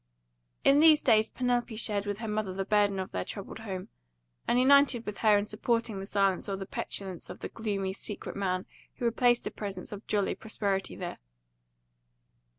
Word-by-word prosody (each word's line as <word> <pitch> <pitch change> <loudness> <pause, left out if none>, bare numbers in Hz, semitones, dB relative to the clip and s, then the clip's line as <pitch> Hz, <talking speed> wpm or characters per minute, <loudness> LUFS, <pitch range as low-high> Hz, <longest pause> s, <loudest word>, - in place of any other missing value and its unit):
In 275 +1 +6
these 310 -1 +7
days 220 -5 +3
Penelope 245 -2 -1
shared 210 -2 +1
with 205 -1 -2
her 225 0 -5
mother 210 -3 -2
the 195 0 -2
burden 205 -1 +2
of 190 -1 -4
their 90 - -2
troubled 200 - -7
home, 190 -4 -6 0.6
and - - +3
united 270 -2 +5
with 210 -1 -5
her 215 -2 +5
in 205 - 0
supporting 220 0 -1
the 195 - -6
silence 195 -2 +1
or 195 - -2
the 195 - -5
petulance 190 -2 -4
of - - -9
the - - -4
gloomy, 200 -4 -2
secret 205 +1 -7
man 185 -2 -1 0.3
who 245 - -4
replaced 240 +1 +3
the - - -4
presence 195 -3 -6
of 205 0 -8
jolly 205 -2 +1
prosperity 200 -3 -2
there. 175 -2 -6
210 Hz, 180 wpm, -29 LUFS, 195-230 Hz, 0.6 s, these